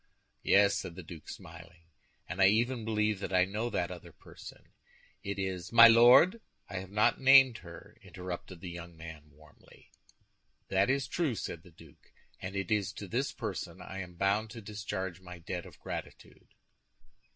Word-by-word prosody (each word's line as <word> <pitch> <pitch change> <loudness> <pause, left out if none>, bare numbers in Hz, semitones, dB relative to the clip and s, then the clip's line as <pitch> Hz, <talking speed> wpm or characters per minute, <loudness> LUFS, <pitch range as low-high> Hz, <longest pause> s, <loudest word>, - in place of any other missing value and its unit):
"Yes," 100 0 +4
said 85 - -7
the 95 - -9
duke, 80 -1 -11
smiling, 85 -1 -12 0.4
"and 95 - -4
I 95 - +8
even 115 +3 +1
believe 105 -2 0
that 100 - -5
I 90 -1 +4
know 105 +5 -3
that 90 -5 -2
other 90 -2 -10
person; - - -14 0.5
it 100 0 -5
is—" 95 -2 -4
"My 115 0 +10
Lord, 125 - +6 0.3
I 95 - -6
have 95 0 -6
not 105 +5 +2
named 130 -3 +7
her!" 85 -1 -13
interrupted 90 -1 -8
the 90 -2 -7
young 85 -1 -10
man, 80 -2 -11
warmly. 75 +1 -21 0.8
"That 95 +2 +2
is 135 -2 0
true," 150 -1 -1
said 85 - -6
the 90 - -17
duke; 80 -3 -19 0.3
"and 95 +1 -7
it 95 -1 -3
is 100 -2 0
to 105 - -8
this 125 +8 -1
person - - -6
I 95 - -8
am 90 -2 -8
bound 100 +4 0
to 115 0 -9
discharge 95 -3 -5
my 90 -1 -10
debt 85 +1 -6
of - - -15
gratitude." - - -9
95 Hz, 175 wpm, -31 LUFS, 90-110 Hz, 0.8 s, My